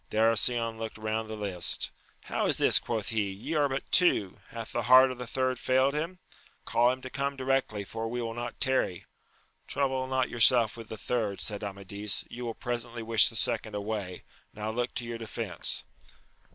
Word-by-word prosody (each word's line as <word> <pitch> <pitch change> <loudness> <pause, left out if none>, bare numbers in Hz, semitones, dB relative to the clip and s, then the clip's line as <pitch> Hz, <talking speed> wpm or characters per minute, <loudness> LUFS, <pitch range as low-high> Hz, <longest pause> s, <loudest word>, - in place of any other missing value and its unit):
Darar 110 +1 +3
sion 115 +1 +2
looked 110 -1 -5
round 110 0 -2
the 110 - -5
lists: 95 -4 0 0.3
How - - -1
is - - +2
this? - - +6
quoth 110 -4 -3
he; 105 -3 0
ye 95 +11 -5
are 145 -2 +2
but 135 +1 -2
two! 105 - +3
hath 115 -1 -7
the 120 - -1
heart 130 +3 +7
of 125 - -8
the 125 - -5
third 130 +1 -1
failed 130 +2 +2
himl 165 +5 -3 0.5
call 120 +1 +3
him 130 0 -6
to 130 - -6
come 140 0 -2
directly, 130 -6 0
for 115 +3 -5
we 120 +2 -3
will 115 -1 -3
not 120 +1 -6
tarry. 130 -9 0 0.6
Trouble 130 -2 -1
not 130 -1 +1
yourself 115 -1 +4
about 115 -2 -10
the 110 - -6
third, 110 -3 -2
said 105 -1 -2
Amadis, 100 +1 -3
you 125 +1 -6
will 115 -1 -4
presently 120 -1 -4
wish 115 -1 +5
the 115 - -12
second 110 -1 -1
away: 100 -3 -4 0.3
now 105 +1 -3
look 120 +2 -2
to 120 - -2
your 115 0 -5
defence 115 -3 -2
115 Hz, 190 wpm, -29 LUFS, 110-130 Hz, 0.6 s, heart